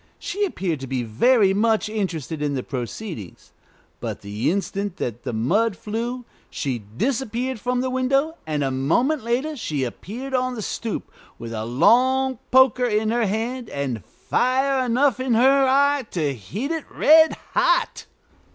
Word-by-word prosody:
She 410 +3 -2
appeared 185 - -2
to 135 - -6
be 130 -1 -2
very 195 - +3
much 220 +2 +2
interested 170 -8 -3
in 145 -1 -1
the 130 - -2
proceedings; 125 - -7 0.5
but - - -5
the 105 +2 -2
instant 195 +1 -2
that 120 0 -4
the - - -4
mud 185 - +1
flew, 235 +6 -4 0.2
she 130 -5 -3
disappeared 240 - -2
from 250 +2 -1
the 260 - -1
window, 275 +5 +1
and 150 -2 -1
a 135 - 0
moment 230 - +1
later 255 +7 -1
she 150 - -2
appeared 235 - -6
on 255 -1 0
the 220 - -5
stoop 225 +2 -4 0.3
with 115 0 -7
a 110 0 -3
long 255 - +3
poker 255 -1 +5
in 215 -1 +1
her 235 -2 +1
hand, 230 +4 -3
and 130 -8 -3
fire 260 - 0
enough 255 +2 +2
in 255 -2 +1
her 270 +3 +5
eye 280 -1 +3
to 150 -5 -1
heat 200 - -5
it 325 -2 -3
red 320 +1 +5 0.2
hot. - - +1
225 Hz, 160 wpm, -23 LUFS, -, 0.5 s, poker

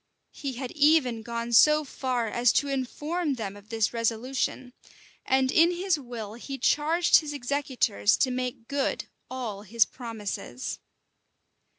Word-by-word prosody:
He 275 -2 -5
had 250 0 -5
even 290 -6 +3
gone 235 +1 -4
so 300 +6 +6
far 255 -4 -2
as 240 +2 +3
to 285 - +2
inform 295 +4 -2
them 205 -5 -5
of 205 +1 -15
this 225 -1 0
resolution; 245 +2 -2 0.5
and 265 0 +3
in 330 +1 +5
his 355 -2 0
will 235 -5 -7
he 270 +4 -7
charged 320 +5 +4
his 300 -2 -3
executors 260 - +1
to 260 - +2
make 250 -2 -4
good 280 -1 -1 0.2
all 235 -6 -5
his 220 +2 +2
promises. 215 - -6
255 Hz, 135 wpm, -27 LUFS, 230-285 Hz, 0.5 s, so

